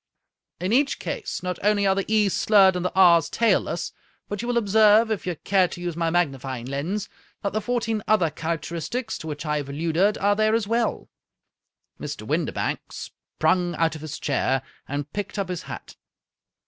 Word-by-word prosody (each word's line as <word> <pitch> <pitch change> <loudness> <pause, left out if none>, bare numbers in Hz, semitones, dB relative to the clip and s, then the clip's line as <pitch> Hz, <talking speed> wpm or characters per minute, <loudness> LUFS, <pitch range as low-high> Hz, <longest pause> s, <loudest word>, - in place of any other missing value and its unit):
In 185 +5 -1
each 275 +3 +3
case, 435 - -5
not 180 0 -3
only 205 0 +2
are 195 - +4
the 195 0 -1
^'s 210 -2 +2
slurred 195 -2 +5
and 180 - -2
the 180 - -1
r's 170 -4 +6
tailless, 190 -6 +1 0.4
but 205 0 -4
you 240 - -5
will 245 -1 +1
observe, 220 +1 +5
if 210 -3 -2
you 180 - -1
care 185 +3 +2
to 175 - -9
use 175 -2 -4
my 165 -1 0
magnifying 135 -7 -1
lens, 160 +11 -3 0.4
that 200 - -1
the 215 - 0
fourteen 225 -1 -1
other 185 -7 +3
characteristics 170 - -3
to 160 - -8
which 150 +1 -5
I 150 0 0
have 145 -2 -4
alluded 165 +8 +1
are 205 +1 +2
there 215 +1 +2
as 225 -2 0
well." 230 +2 -1 0.9
Mr. - - -6
Windibank - - -1
sprung 180 -1 -1
out 165 -1 +1
of 155 - -8
his 155 -1 -6
chair, 135 -2 0 0.2
and 145 +1 -4
picked 205 0 -4
up 195 -2 -2
his 180 -2 -3
hat. - - -9
185 Hz, 185 wpm, -24 LUFS, 165-210 Hz, 0.9 s, r's